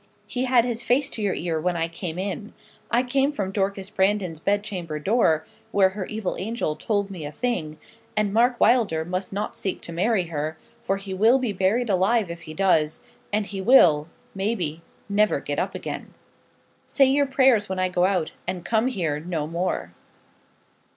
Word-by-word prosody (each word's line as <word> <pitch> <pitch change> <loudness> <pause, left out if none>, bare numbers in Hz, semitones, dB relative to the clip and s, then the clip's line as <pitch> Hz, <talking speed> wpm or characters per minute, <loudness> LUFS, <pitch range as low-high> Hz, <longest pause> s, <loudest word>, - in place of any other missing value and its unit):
he 250 +1 -2
had 245 -2 +4
his 240 -1 -2
face 255 +3 +1
to 220 - -6
your 200 -3 0
ear 165 -2 -2
when 175 +1 0
I 165 0 0
came 165 0 -5
in. 200 +3 -4 0.3
I 240 +2 +3
came 270 +3 +1
from 200 -9 -3
Dorcas 195 0 -2
Brandon's 190 -5 +1
bed 205 +4 +1
chamber 175 -7 -5
door, 160 -3 +2 0.3
where 195 -2 +4
her 190 -1 -5
evil 215 -3 -3
angel 205 -6 -2
told 200 0 -1
me 175 -5 -7
a 145 - -5
thing; 160 -6 -2 0.4
and 210 -2 +1
Mark 240 +2 +3
Wylder 215 -10 +3
must 185 +2 -3
not 205 +2 -3
seek 190 - -2
to - - -6
marry 195 +3 +2
her, 155 0 -3 0.3
for 195 - 0
he 195 -1 -6
will 220 +7 +5
be 250 -5 -1
buried 200 +6 +1
alive 200 0 +2
if 170 0 -8
he 155 -1 -9
does, 155 -5 +2 0.3
and 210 0 +1
he 195 -1 -5
will, 175 - +6 0.3
maybe, 190 -6 -2 0.3
never 210 +1 +2
get - - -3
up - - -2
again. - - -6 0.7
Say 275 - +4
your 280 +2 +3
prayers 260 -6 +3
when 190 - -2
I 185 0 +2
go 180 0 +1
out, 185 -5 0 0.2
and 180 -2 -3
come 225 +3 +2
here 165 - -1
no 160 -2 -3
more.' 165 - -2
195 Hz, 185 wpm, -24 LUFS, 170-225 Hz, 0.7 s, will